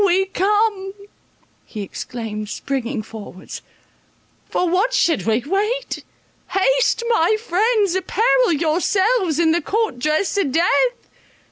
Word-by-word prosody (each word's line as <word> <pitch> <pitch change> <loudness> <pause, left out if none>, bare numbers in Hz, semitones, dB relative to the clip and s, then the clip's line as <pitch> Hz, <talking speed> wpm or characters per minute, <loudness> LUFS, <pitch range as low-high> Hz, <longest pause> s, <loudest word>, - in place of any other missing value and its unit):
We 385 0 +3
come," 395 0 0 0.7
he 210 -3 -7
exclaimed, 215 0 -6
springing 255 -1 -3
forwards, 205 -4 -9 0.9
"for 360 - 0
what 395 +9 +1
should 330 - +1
we 225 +2 +1
wait? 425 +9 -2 0.4
Haste, - - +2
my 435 -2 +3
friends, 425 -1 +1
apparel 450 +5 +2
yourselves 355 - +1
in 330 -1 +3
the 340 - +1
court 430 - -1
dress 305 +9 0
of 280 -9 0
death. 485 +9 +1
370 Hz, 115 wpm, -20 LUFS, 295-435 Hz, 0.9 s, We